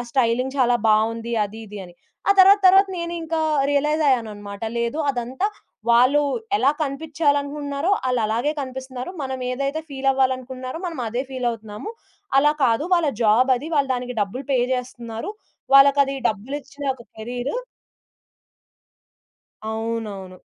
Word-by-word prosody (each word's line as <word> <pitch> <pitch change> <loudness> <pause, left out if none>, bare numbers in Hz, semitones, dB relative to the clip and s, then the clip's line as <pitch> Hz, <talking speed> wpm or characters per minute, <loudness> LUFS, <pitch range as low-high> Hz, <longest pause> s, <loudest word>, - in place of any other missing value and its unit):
Styling 255 +1 +1
చాలా 245 -1 +4
బావుంది, 230 +2 +1
అది 220 +3 -11
ఇది 210 0 -9
అని. 175 - -16 0.3
ఆ - - +7
తరువాత 395 +2 +8
తరువాత 385 +2 +6
నేను 340 0 -4
ఇంకా 325 0 -2 0.3
రియలైజయ్యానన్నమాట, 260 -9 0 0.2
లేదు 235 +6 -1
అదంతా 255 +9 -2 0.4
వాళ్ళు 255 +5 +5 0.4
ఎలా 280 -8 +4
కనిపించాలనుకుంటున్నారో 285 +1 -1 0.2
ఆళ్ళలాగే 235 +3 0
కనిపిస్తున్నారు. 260 +2 -6
మనమేదైతే 265 +3 -2
ఫీలవ్వాలనుకుంటున్నారో 260 0 -1
మనం 330 -6 -5
అదే 240 +4 -2
ఫీలవుతున్నాము. 235 - -4 0.5
అలా 295 +2 +5
కాదు, 240 +6 +2
వాళ్ళ 340 -4 +2
జాబది 255 +6 +3
వాళ్ళు 280 -2 +1
దానికి 250 -1 -5
డబ్బులు 250 +8 -5
పే 260 - +3
జేస్తున్నారు. 240 - -5 0.4
వాళ్ళకది 275 0 +6
డబ్బులిచ్చిన 275 +6 -7
ఒక 250 - -14
కేరీరు. 245 - -4 2.1
అవునవును. 220 -4 -4
260 Hz, 110 wpm, -22 LUFS, 230-285 Hz, 2.1 s, తరువాత